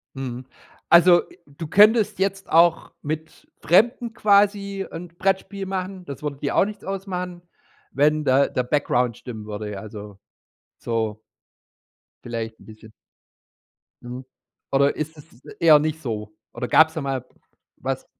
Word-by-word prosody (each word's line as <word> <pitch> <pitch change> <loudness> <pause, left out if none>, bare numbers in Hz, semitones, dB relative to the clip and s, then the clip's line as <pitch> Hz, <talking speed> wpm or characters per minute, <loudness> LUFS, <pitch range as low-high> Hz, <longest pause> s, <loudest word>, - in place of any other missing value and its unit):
Mhm. 130 -1 -6 0.4
Also, 175 +1 +7
äh, - - -18
du 145 +3 -8
könntest 215 +3 +5
jetzt 195 0 -1
auch 165 0 +4
mit 155 +2 -6
Fremden 235 +5 +3
quasi 200 -2 +2
'n 175 +1 -7
Brettspiel 195 +3 -2
machen- 185 -1 -4
das 140 0 -8
würde 145 -2 -4
dir 140 - -2
auch - - +5
nichts 205 0 -8
ausmachen- 180 -2 -5 0.5
wenn 150 +2 +2
da 135 +1 +4
der 125 - -1
Background 125 -3 0
stimmen 110 -4 -9
würde, 105 0 -5
ja, 100 - -6
also, 105 -2 -10 0.6
so 110 -2 -3 1.0
vielleicht 115 -1 -5
'n - - -16
bisschen. 110 0 -14 1.1
Mhm. 125 +2 -8 0.5
Oder 140 +1 +3
ist 155 +1 -4
es 140 -4 -18
eher 160 -3 +7
nicht 155 +1 -2
so? 105 -5 -5 0.2
Oder 125 - -5
gab's 160 0 +5
da 160 - -3
mal 135 -3 -3 0.5
was? - - -4
155 Hz, 140 wpm, -23 LUFS, 125-190 Hz, 1.1 s, Also